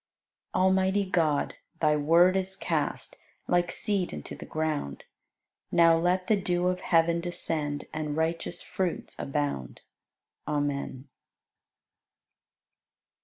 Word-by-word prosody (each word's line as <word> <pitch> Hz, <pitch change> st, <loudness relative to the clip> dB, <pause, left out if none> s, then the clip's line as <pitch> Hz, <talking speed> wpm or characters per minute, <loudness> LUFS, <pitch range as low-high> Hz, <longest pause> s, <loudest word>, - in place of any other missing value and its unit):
89. 185 Hz, -, +3 dB
Almighty 190 Hz, +1 st, +3 dB
God, 160 Hz, -6 st, +1 dB, 0.2 s
Thy 150 Hz, -1 st, +3 dB
Word 170 Hz, +5 st, +5 dB
is 190 Hz, 0 st, -1 dB
cast -, -, -2 dB, 0.3 s
Like 175 Hz, -1 st, +2 dB
seed 200 Hz, -4 st, 0 dB
into 75 Hz, -, -7 dB
the -, -, -9 dB
ground; 155 Hz, -, -2 dB, 0.7 s
Now 165 Hz, -1 st, +6 dB
let 180 Hz, +2 st, +1 dB
the 215 Hz, -, +3 dB
dew 180 Hz, -2 st, 0 dB
of 180 Hz, 0 st, -2 dB
heaven 170 Hz, -1 st, +3 dB
descend 155 Hz, -4 st, -2 dB
And 155 Hz, -1 st, -3 dB
righteous 165 Hz, +2 st, -1 dB
fruits 185 Hz, -3 st, -3 dB
abound. 140 Hz, -, -3 dB, 0.7 s
Amen. 145 Hz, -2 st, -2 dB
165 Hz, 110 wpm, -28 LUFS, 150-185 Hz, 0.7 s, Now